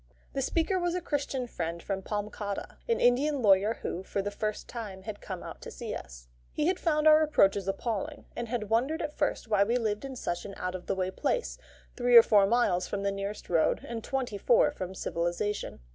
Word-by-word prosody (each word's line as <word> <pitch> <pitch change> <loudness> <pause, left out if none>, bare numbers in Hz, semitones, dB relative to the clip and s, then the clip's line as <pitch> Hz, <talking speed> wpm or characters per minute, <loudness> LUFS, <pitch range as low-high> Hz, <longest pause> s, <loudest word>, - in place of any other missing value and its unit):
The 275 - -1
speaker 335 +7 +1
was 350 0 0
a - - 0
Christian 280 -4 -2
friend 170 -7 -4
from 195 -1 -2
Palamcottah, 205 0 -4
an 465 - +2
Indian 270 +3 +3
lawyer 200 +2 +5
who, 180 - -3
for 195 +1 -3
the 205 - -2
first 215 +1 -3
time, 205 -5 -7
had 215 -1 -7
come 185 -3 -6
out - - -9
to - - -7
see - - -6
us. - - -9 0.2
He 300 - -1
had 365 +2 +1
found 305 -2 +2
our 310 0 +8
approaches 200 -11 +3
appalling, 235 +9 -3
and 240 - -3
had 220 -3 -3
wondered 265 +9 +1
at 300 - -4
first 290 -5 -1
why 210 -2 +4
we 235 +4 +1
lived 215 -2 -1
in 270 -1 -6
such 175 -7 -3
an 195 - -8
out 180 0 -3
of 185 -1 -7
the 195 - 0
way 185 0 -1
place, 480 - -1 0.4
three 245 -1 +6
or 230 - +11
four 205 -4 +5
miles 200 -6 +2
from 200 -1 -3
the 200 - +1
nearest 195 +1 -5
road, 165 -2 +2
and 230 -2 -5
twenty 250 -6 -2
four - - +4
from 185 0 -6
civilisation. 175 - -2
215 Hz, 215 wpm, -29 LUFS, 195-270 Hz, 0.4 s, or